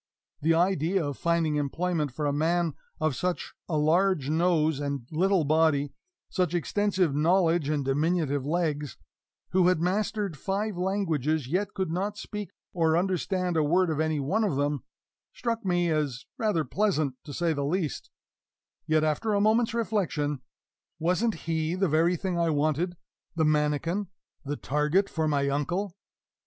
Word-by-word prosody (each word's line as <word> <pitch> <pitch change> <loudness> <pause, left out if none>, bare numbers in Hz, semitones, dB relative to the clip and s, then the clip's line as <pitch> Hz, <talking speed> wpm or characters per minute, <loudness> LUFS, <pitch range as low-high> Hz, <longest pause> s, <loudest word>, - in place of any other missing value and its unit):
The 165 +2 +3
idea 175 0 +2
of 145 -1 -3
finding 165 -3 +1
employment 150 +1 -1
for 150 +4 -3
a 145 - +1
man 165 +2 +1 0.3
of 155 -3 0
such 180 +4 -2 0.2
a 155 - 0
large 155 -1 +2
nose 160 -3 +2
and 140 -4 -3
little 185 +2 +2
body, 150 -2 +2 0.3
such 180 -3 0
extensive 185 - +1
knowledge 165 0 +2
and 145 -3 0
diminutive 145 0 +1
legs 150 -2 -1 0.5
who 180 -1 +4
had 185 -3 +3
mastered 200 +1 -1
five 200 +4 -2
languages 165 -6 0
yet 185 +7 -1
could 190 -4 -1
not 200 +4 -2
speak 210 -1 -6 0.2
or 165 -2 +2
understand 185 0 0
a 160 - +3
word 175 +3 +2
of 155 - -2
any 155 -1 +1
one 190 +11 0
of 200 -9 0
them, 145 -1 -1 0.5
struck 230 -1 -2
me 175 -2 +1
as 145 -5 -1
rather 210 -8 +1
pleasant, 155 -4 0
to 150 - -8
say 165 +3 0
the 145 -2 -2
least; 155 0 -2 0.8
yet, 155 0 +3
after 180 +8 0
a - - +3
moment's 220 +2 +2
reflection 165 - -1 0.6
wasn't 180 +7 +1
he 160 0 0
the 190 +1 +1
very 165 +3 +3
thing 175 0 -2
I 170 -1 +2
wanted, 155 +4 0 0.4
the 160 -1 +2
manikin, 155 +6 +1 0.4
the 145 0 -3
target 150 +8 +1
for 160 -1 0
my 140 -2 +1
uncle? 175 +7 -1
165 Hz, 155 wpm, -27 LUFS, 150-185 Hz, 0.8 s, who